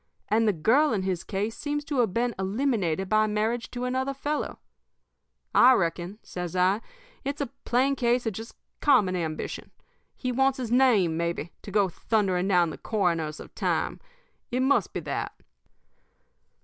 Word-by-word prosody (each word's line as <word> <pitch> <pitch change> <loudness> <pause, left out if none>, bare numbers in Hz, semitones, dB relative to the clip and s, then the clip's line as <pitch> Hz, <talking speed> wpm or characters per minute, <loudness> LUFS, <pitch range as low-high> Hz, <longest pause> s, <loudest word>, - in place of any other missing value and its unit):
And 220 +2 +3
the - - +5
girl 230 - +3
in 195 -3 0
his 185 -2 -2
case 205 +3 -3
seems 295 0 -3
to 285 -4 -1
have 230 -5 +3
been 235 +4 0
eliminated 195 - 0
by 215 +1 +3
marriage 220 +3 -1
to 245 0 -5
another 260 +2 -1
fellow. 290 +2 -3 1.0
I 255 +2 +8
reckon,' 175 -1 -1
says 180 -1 -5
I, 185 +4 +3 0.4
'it's 280 +2 -3
a 280 -5 -3
plain 265 +3 +2
case 245 -1 +1
of 225 - -1
just 225 +4 -8 0.2
common 215 -11 +4
ambition. 160 -3 -4 0.5
He 255 - -2
wants 270 +1 +2
his 245 -3 -4
name, 225 -10 +4
maybe, 170 -1 -2
to - - -9
go 200 -1 +3
thundering 190 -1 0
down 175 -4 +3
the - - -9
coroners 165 -7 -1
of - - -11
time. - - -1 0.5
It 250 +1 0
must 275 +2 +2
be - - -4
that.' - - -4
215 Hz, 160 wpm, -27 LUFS, 185-255 Hz, 1.0 s, I